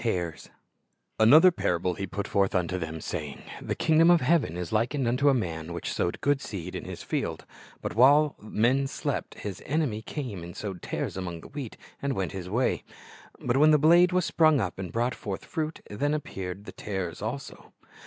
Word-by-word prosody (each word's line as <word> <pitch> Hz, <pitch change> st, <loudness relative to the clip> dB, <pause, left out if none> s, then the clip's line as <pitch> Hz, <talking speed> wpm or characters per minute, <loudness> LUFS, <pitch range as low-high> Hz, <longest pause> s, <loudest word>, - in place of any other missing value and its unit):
ares 90 Hz, -8 st, -2 dB, 0.7 s
A 110 Hz, -, +6 dB
MOTHER 160 Hz, +8 st, +8 dB
parable 90 Hz, -, 0 dB, 0.2 s
put 100 Hz, +1 st, -3 dB
He -, -, -14 dB
forth 100 Hz, -1 st, +2 dB
unto 90 Hz, 0 st, 0 dB
them, 80 Hz, -1 st, -5 dB
saying, 75 Hz, -2 st, -5 dB, 0.2 s
■'^ -, -, -11 dB
The -, -, 0 dB
kingdom 165 Hz, +1 st, +4 dB
of 175 Hz, -2 st, +6 dB
heaven 140 Hz, -, +2 dB
is 90 Hz, -2 st, -4 dB
hkened 120 Hz, +4 st, +1 dB
unto 130 Hz, +5 st, +3 dB
a 135 Hz, -, +4 dB
man 85 Hz, -7 st, -3 dB
which 85 Hz, -, -4 dB
sowed 85 Hz, -, -1 dB
good 145 Hz, -1 st, +2 dB
seed 90 Hz, -6 st, -6 dB
in -, -, -5 dB
his -, -, -7 dB
field; -, -, -3 dB, 0.4 s
but -, -, -3 dB
while 145 Hz, +5 st, +5 dB
men 120 Hz, +6 st, +1 dB
slept, -, -, -3 dB
his 100 Hz, -3 st, -6 dB
enemy 135 Hz, -7 st, -1 dB
came 120 Hz, -, -5 dB
and 85 Hz, 0 st, -9 dB
sowed 95 Hz, -4 st, -5 dB
tares -, -, -3 dB
among 85 Hz, -3 st, -5 dB
the -, -, -12 dB
wheat, 140 Hz, -6 st, -7 dB, 0.2 s
and 140 Hz, -1 st, 0 dB
went 95 Hz, -6 st, -2 dB
his 90 Hz, -2 st, -6 dB
way. 120 Hz, +6 st, 0 dB, 0.6 s
But 125 Hz, +1 st, +1 dB
when 150 Hz, +2 st, +6 dB
the 155 Hz, -, +6 dB
blade 170 Hz, +4 st, +6 dB
was 180 Hz, -2 st, +2 dB
sprung 155 Hz, -3 st, +4 dB
up, 95 Hz, -4 st, -3 dB
and 95 Hz, -3 st, -5 dB
brought 120 Hz, +2 st, 0 dB
forth 100 Hz, -2 st, -6 dB
fruit, 160 Hz, -2 st, -3 dB
then 145 Hz, +9 st, -1 dB
appeared 95 Hz, -9 st, -5 dB
the -, -, -8 dB
tares 95 Hz, -5 st, -4 dB
also." 120 Hz, +6 st, -6 dB
110 Hz, 200 wpm, -27 LUFS, 90-145 Hz, 0.7 s, MOTHER